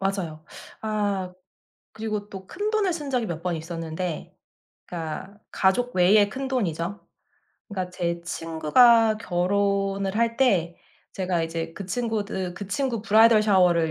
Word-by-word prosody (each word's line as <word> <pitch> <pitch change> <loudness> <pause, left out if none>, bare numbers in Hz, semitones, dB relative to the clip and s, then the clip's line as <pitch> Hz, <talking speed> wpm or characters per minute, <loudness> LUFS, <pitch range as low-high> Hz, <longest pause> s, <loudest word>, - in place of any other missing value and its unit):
맞아요. 185 -6 -3 0.4
아 205 -4 -1 0.6
그리고 215 -2 -4
또 190 -1 -9
큰돈을 415 - 0
쓴 295 -4 -5
적이 250 -3 0
몇 170 -5 -5
번 175 -1 -1
있었는데 165 +1 -5 0.5
그러니까 175 +4 -6
가족 220 +5 +1
외에 200 +3 +5
큰돈이죠. 205 - -3 0.6
그러니까 185 -3 -4
제 170 -1 -2
친구가 215 +8 +4
결혼을 195 +1 0
할 230 0 +1
때 180 -10 +2 0.4
제가 180 -3 -1
이제 165 0 -4
그 195 +2 -8
친구들 205 -4 -2
그 200 - -7
친구 260 -2 -1
브라이덜 220 0 +6
샤워를 180 -5 +3
195 Hz, 270 characters per minute, -25 LUFS, 175-220 Hz, 0.6 s, 브라이덜